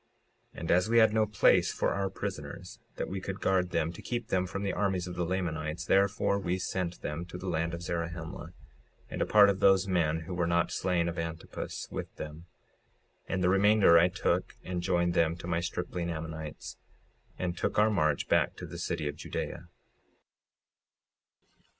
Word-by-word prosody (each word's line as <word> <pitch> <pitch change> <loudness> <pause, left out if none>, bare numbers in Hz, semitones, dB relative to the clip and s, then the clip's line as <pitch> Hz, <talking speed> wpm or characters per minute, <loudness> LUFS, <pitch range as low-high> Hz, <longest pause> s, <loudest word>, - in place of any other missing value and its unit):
56:57 - - -8
And 85 - -1
as 90 +4 +3
we 115 - +3
had 110 -2 +6
no 110 -1 +3
place 105 - +4
for - - 0
our 100 0 -1
prisoners, 95 - -6 0.2
that - - -3
we 95 0 -4
could 95 0 -5
guard 95 -2 +1
them 85 -1 -1
to - - -10
keep 120 -2 -4
them 95 -1 +1
from 100 +2 -4
the 100 - -1
armies 95 -3 0
of 90 - -6
the 90 0 -2
Lamanites, 80 -4 -2
therefore 100 +1 +2
we 90 -2 -1
sent 90 -1 -3
them 75 +3 -3
to 90 0 -8
the 95 - -7
land 85 -1 -1
of 85 - -8
Zarahemla, 85 0 -4 0.6
and - - -3
a - - +1
part 105 -1 +7
of 100 -1 +1
those 95 -1 +5
men 80 -4 +1
who 85 +3 -6
were 85 -1 0
not 85 0 +1
slain 90 -2 0
of 85 0 -3
Antipus, 80 0 -5
with - - -6
them; 75 +3 -8 0.8
and 95 -1 -1
the 90 - +4
remainder 100 -3 +6
I 85 - +5
took 90 - -1
and 90 -1 -3
joined 85 0 +1
them 80 -1 +2
to 85 - -10
my 85 -1 0
stripling 85 0 -3
Ammonites, 80 -1 -6 0.6
and 90 -1 -2
took - - -2
our 105 +1 +5
march 75 -7 +1
back - - +2
to - - -7
the - - -8
city 75 - -2
of 75 - -3
Judea. - - -5
90 Hz, 190 wpm, -30 LUFS, 85-95 Hz, 0.8 s, part